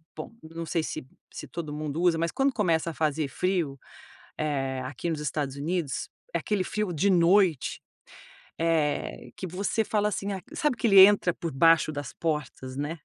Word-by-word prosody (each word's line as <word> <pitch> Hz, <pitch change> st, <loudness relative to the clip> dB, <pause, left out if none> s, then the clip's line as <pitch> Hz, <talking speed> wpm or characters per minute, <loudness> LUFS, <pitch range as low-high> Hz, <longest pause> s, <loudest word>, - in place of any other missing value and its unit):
bom, 155 Hz, -, -7 dB
não 165 Hz, +1 st, -7 dB
sei 165 Hz, +1 st, 0 dB
se 155 Hz, -, -5 dB, 0.3 s
se -, -, -7 dB
todo 155 Hz, -4 st, -6 dB
mundo 150 Hz, +1 st, -3 dB
usa, 175 Hz, -2 st, +3 dB
mas 165 Hz, +1 st, 0 dB
quando 270 Hz, 0 st, +1 dB
começa 170 Hz, -7 st, +1 dB
a -, -, -10 dB
fazer 155 Hz, -1 st, 0 dB
frio, 170 Hz, -4 st, -1 dB, 0.6 s
eh 135 Hz, -3 st, -1 dB
aqui 145 Hz, +6 st, -4 dB
nos 155 Hz, -2 st, -2 dB
Estados 145 Hz, -2 st, -2 dB
Unidos, 155 Hz, -2 st, -2 dB, 0.2 s
é -, -, +2 dB
aquele 205 Hz, -3 st, -1 dB
frio 210 Hz, 0 st, -2 dB
de 180 Hz, +6 st, +2 dB
noite, 175 Hz, -3 st, +3 dB, 0.8 s
eh, 160 Hz, -3 st, 0 dB
que -, -, -7 dB
você 195 Hz, +5 st, -1 dB
fala 210 Hz, 0 st, +1 dB
assim, 200 Hz, 0 st, -3 dB
ah, 190 Hz, -, -4 dB
sabe 300 Hz, -5 st, 0 dB
que 240 Hz, -, 0 dB
ele 195 Hz, -3 st, +8 dB
entra 195 Hz, -4 st, +2 dB
por 165 Hz, -, -4 dB
baixo 165 Hz, +3 st, +4 dB
das 145 Hz, -1 st, -5 dB
portas, 150 Hz, -5 st, -3 dB
né. 145 Hz, +4 st, -3 dB
165 Hz, 180 wpm, -27 LUFS, 150-185 Hz, 0.8 s, ele